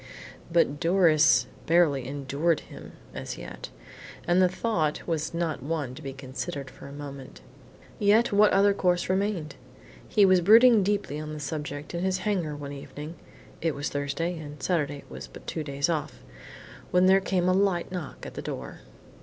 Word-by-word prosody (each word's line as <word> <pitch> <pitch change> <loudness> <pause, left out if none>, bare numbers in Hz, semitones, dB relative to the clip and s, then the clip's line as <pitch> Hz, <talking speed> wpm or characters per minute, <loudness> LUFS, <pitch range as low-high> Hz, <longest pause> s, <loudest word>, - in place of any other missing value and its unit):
But 165 -4 +2
Doris 165 -3 +4 0.2
barely 155 -6 +3
endured 145 +4 0
him - - -12 0.2
as - - -6
yet, - - -8 0.6
and 175 +1 +3
the 185 - +5
thought 175 -6 -1
was 160 -2 -1
not 170 -4 -2
one 145 -2 -3
to 150 - -10
be 135 -3 -5
considered 135 +1 -6
for - - -12
a - - -10
moment. 140 -2 -9 0.6
Yet 210 +3 +4
what 205 +1 +5
other 200 +1 +4
course 180 -3 +1
remained? 190 -6 -1 0.5
He 205 - +4
was 185 -1 +5
brooding 225 +4 +7
deeply 200 -7 -1
on 155 0 -6
the 150 - -6
subject, 150 0 -5
in 170 +1 -2
his 190 0 +1
hangar 175 -8 -1
one 145 -1 -7
evening 145 +3 -8 0.5
(it 160 -2 0
was 145 - -3
Thursday 145 +5 -2
and 145 -1 -9
Saturday 145 -5 -1
was - - -9
but - - -13
two 160 - -3
days 140 -1 -1
off) 160 -4 -3 0.7
when 180 +1 +4
there 190 +1 +5
came 185 -2 0
a 185 - +4
light 190 -3 +1
knock 180 -5 -6
at - - -8
the - - -6
door. 65 -1 -6
165 Hz, 170 wpm, -27 LUFS, 145-185 Hz, 0.7 s, brooding